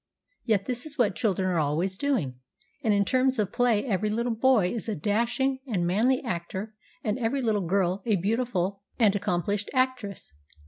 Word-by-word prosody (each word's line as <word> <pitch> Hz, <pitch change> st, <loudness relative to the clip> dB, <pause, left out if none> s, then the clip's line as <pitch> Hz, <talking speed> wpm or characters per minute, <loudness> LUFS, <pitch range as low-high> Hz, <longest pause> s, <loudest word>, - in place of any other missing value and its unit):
Yet 205 Hz, -4 st, +2 dB
this 250 Hz, +3 st, -3 dB
is 295 Hz, -1 st, -7 dB
what 225 Hz, -7 st, +3 dB
children 190 Hz, -5 st, 0 dB
are 180 Hz, -3 st, +1 dB
always 160 Hz, +6 st, 0 dB
doing, 190 Hz, -, -1 dB, 0.4 s
and 220 Hz, -, +2 dB
in 200 Hz, -1 st, +3 dB
terms 260 Hz, +3 st, +2 dB
of 205 Hz, -3 st, 0 dB
play 240 Hz, -3 st, +2 dB
every 210 Hz, -3 st, 0 dB
little 235 Hz, +2 st, 0 dB
boy 225 Hz, -5 st, +3 dB
is 230 Hz, -1 st, -4 dB
a 215 Hz, -, -1 dB
dashing 235 Hz, -, 0 dB
and 190 Hz, -8 st, 0 dB
manly 230 Hz, +10 st, +2 dB
actor 190 Hz, 0 st, -4 dB, 0.3 s
and 215 Hz, +3 st, -1 dB
every 255 Hz, +3 st, 0 dB
little 210 Hz, -6 st, 0 dB
girl 190 Hz, +1 st, +1 dB
a 215 Hz, -, +4 dB
beau 200 Hz, +5 st, 0 dB
tiful 200 Hz, -4 st, -2 dB, 0.2 s
and 210 Hz, -4 st, +4 dB
accomplished 200 Hz, +1 st, -1 dB
actress. 250 Hz, -, -1 dB
210 Hz, 180 wpm, -27 LUFS, 190-245 Hz, 0.4 s, a